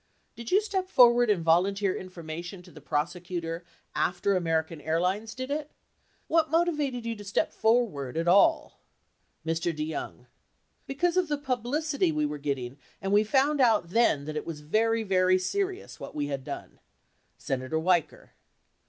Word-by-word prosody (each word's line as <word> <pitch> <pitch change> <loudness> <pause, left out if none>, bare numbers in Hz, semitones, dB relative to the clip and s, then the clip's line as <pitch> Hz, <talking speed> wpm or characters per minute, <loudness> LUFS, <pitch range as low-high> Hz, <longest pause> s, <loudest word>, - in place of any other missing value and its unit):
Did 235 0 -7
you 395 +3 +4
step 380 -3 -2
forward 240 - +6
and 190 -5 +2
volunteer 190 +4 +3
in 185 - -7
formation 170 +1 -7
to - - -16
the 150 - -13
prosecutor 170 +2 -3 0.3
after 185 +2 +1
American 165 -2 -1
Airlines 185 +8 -1
did 260 +2 -5
it? 300 0 -2 0.6
What 320 -1 +2
motivated 295 -7 0
you 230 0 -2
to 205 - -10
step 195 -1 -1
forward 215 - +1
at 165 +1 -1
all? 200 - +4 0.7
Mr. 165 +1 0
DeYoung. 155 0 -5 0.6
Because 345 +6 0
of 365 -2 +2
the 295 -1 -1
publicity 270 - -1
we 150 -1 0
were 150 0 -4
getting 135 -2 -4 0.2
and 195 - -3
we 205 +1 +5
found 275 +6 +2
out 220 -8 +3
then 190 -11 +3
that 155 0 -5
it 150 - -4
was 155 -3 -6
very, 225 +8 +1
very 185 -2 +3
serious, 385 - -3
what - - -9
we 145 -1 -1
had 140 -2 -4
done. - - -8 0.6
Senator 130 +3 -3
Weicker. 175 0 0
190 Hz, 160 wpm, -28 LUFS, 165-255 Hz, 0.7 s, forward